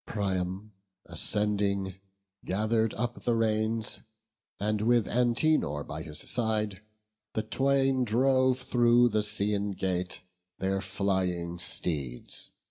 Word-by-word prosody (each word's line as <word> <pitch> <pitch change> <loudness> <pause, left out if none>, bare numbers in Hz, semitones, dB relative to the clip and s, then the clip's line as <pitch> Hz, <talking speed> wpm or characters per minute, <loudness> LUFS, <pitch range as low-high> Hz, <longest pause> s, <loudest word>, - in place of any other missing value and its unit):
Priam, 95 0 -2 0.3
ascending, 100 +1 0 0.5
gather'd 110 +3 +1
up 120 +2 -3
the 120 -1 +1
reins, 110 0 0 0.6
And 105 +1 0
with 120 0 +3
Antenor 120 - +2
by 75 +2 -6
his 75 -1 -8
side, 110 -5 0 0.5
the 110 - 0
twain 135 +3 +2
Drove 130 +2 +3
through 120 -1 +4
the 110 -1 +1
Scaean 105 -1 0
gate 90 -1 -2 0.3
their 95 0 0
flying 95 -3 -1
steeds. 75 -7 -3
105 Hz, 105 wpm, -29 LUFS, 95-120 Hz, 0.6 s, through